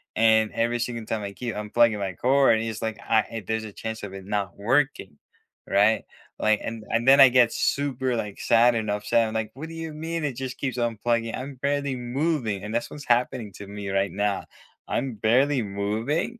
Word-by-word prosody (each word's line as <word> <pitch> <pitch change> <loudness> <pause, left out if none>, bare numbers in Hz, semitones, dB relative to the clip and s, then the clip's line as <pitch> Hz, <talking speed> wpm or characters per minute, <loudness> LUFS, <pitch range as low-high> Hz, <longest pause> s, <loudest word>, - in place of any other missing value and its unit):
and 110 -1 +4
every 120 +1 0
single 115 -2 -3
time 110 -1 -2
I 100 - -4
keep 120 -1 -5
unplugging 105 +1 +2
my 95 -2 -3
cord, 135 0 +4
and - - -2
it's 110 -1 -5
like, 110 -1 -3
I 110 -1 +2
and 110 -4 -6
there's 110 0 -1
a 105 -2 -8
chance 110 -1 -6
of 100 -2 -6
it 95 -1 -9
not 100 -3 -3
working, 120 - 0 0.5
right? 105 +3 +3 0.3
Like, 110 -1 +2
and 115 -1 -5
and 115 +2 0
then 140 +1 +8
I 135 -2 +10
get 120 -2 +4
super, 130 -3 0
like, 105 -3 -4
sad 120 +1 +4
and 110 -2 -2
upset. 110 +2 +1
I'm 110 - -6
like, 110 -1 -2
"What 150 +5 -7
do - - -9
you 160 -1 -6
mean 165 +1 -4
it 140 -3 -1
just 130 0 -5
keeps 130 -3 -3
unplugging? 115 0 0
I'm 135 +1 -6
barely 140 0 -1
moving," 125 - -1
and 105 +1 -5
that's 120 - -1
what's 145 -2 -9
happening 120 -3 +1
to 100 +1 -10
me 100 -1 -6
right 95 0 0
now. 100 0 -1 0.4
I'm 130 -4 -2
barely 125 +6 +2
moving, 110 - -2
115 Hz, 210 wpm, -25 LUFS, 105-130 Hz, 0.5 s, I